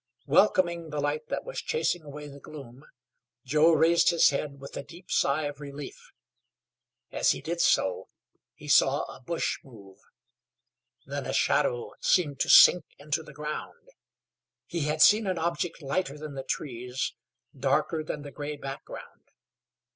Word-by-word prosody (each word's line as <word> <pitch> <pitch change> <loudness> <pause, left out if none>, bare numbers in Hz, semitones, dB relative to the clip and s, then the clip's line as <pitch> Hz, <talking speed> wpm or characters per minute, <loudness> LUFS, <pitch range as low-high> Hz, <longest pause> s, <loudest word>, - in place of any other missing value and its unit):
Welcoming 170 -5 +2
the 150 -1 -4
light 145 +2 -2
that - - -3
was - - -5
chasing 465 - -1
away 150 0 -9
the 140 0 -11
gloom, 135 -3 -12 0.6
Joe 155 +5 +4
raised 165 +2 +4
his 170 -3 +5
head 140 0 -4
with 140 - -10
a - - -4
deep 170 +6 -14
sigh 140 +3 +2
of 145 -1 -5
relief. 140 -1 -9 1.0
As - - +2
he - - -7
did 170 +1 -2
so 95 -1 +2 0.5
he - - -13
saw - - +4
a - - -10
bush 165 +6 -2
move; 100 -7 -15 1.1
then - - -5
a - - -3
shadow 120 - +1
seemed 145 -7 +1
to - - 0
sink 180 - +8
into 150 +2 -2
the 155 - -13
ground. 150 - -7 0.8
He 165 -4 -3
had 155 +1 +3
seen 215 0 +5
an 185 -2 -1
object 170 0 -2
lighter 140 +1 -2
than 150 -1 -8
the 135 - -5
trees, 125 -1 -4 0.4
darker 160 -1 0
than 150 -1 -5
the 145 - -9
gray 145 +2 -6
background. 135 -1 -9
150 Hz, 155 wpm, -28 LUFS, 140-170 Hz, 1.1 s, sink